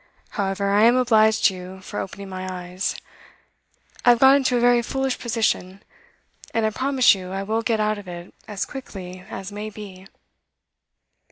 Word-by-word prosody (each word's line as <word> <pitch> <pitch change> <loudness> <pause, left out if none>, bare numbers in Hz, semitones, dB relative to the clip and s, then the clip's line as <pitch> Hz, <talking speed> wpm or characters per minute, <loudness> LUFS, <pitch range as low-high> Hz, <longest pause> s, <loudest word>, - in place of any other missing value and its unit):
However, 200 0 -1
I 205 +2 +5
am 240 +2 +6
obliged 220 -4 +3
to 195 - +5
you 185 +1 -9
for - - -6
opening 200 +1 -6
my 185 0 -5
eyes. 180 +1 -4 1.1
I - - +5
have 240 - +7
got 265 +1 +7
into 260 -3 +2
a - - +2
very 240 0 +4
foolish 265 +2 -2
position, 215 -5 -1 0.7
and 225 -1 +2
I 215 - +1
promise 260 +3 +4
you 185 -2 -6
I 195 +1 -3
will 220 +3 -1
get 225 -1 0
out 215 0 0
of 200 - -12
it 175 0 -9
as 205 -2 -3
quickly 185 -9 -9
as 195 +1 -7
may 210 +1 -5
be. 195 -3 -11
210 Hz, 175 wpm, -23 LUFS, 190-235 Hz, 1.1 s, have